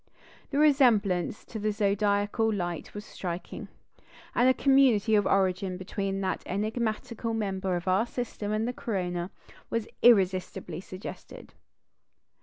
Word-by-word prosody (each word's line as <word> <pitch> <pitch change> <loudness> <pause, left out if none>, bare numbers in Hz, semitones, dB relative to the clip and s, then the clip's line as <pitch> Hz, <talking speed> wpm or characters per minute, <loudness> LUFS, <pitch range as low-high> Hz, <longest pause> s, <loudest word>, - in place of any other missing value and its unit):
The 280 - -2
resemblance 225 - +3
to 220 - -7
the 215 +1 0
zodiacal 205 +1 +1
light 175 -5 -4
was 205 0 -6
striking; 175 -3 -6 0.7
and 245 +2 +4
a - - +5
community 260 -6 +4
of 205 -2 +4
origin 185 -1 +1
between 195 +1 -3
that 190 -1 -1
enigmatical 220 +2 -2
member 190 -3 -1
of 175 +1 -5
our 190 +6 +2
system 230 -4 -4
and 215 +2 0
the 250 - -2
corona 180 -6 -3 0.4
was 230 -2 -2
irresistibly 185 -6 +3
suggested. 185 0 -10
205 Hz, 125 wpm, -28 LUFS, 185-225 Hz, 0.7 s, a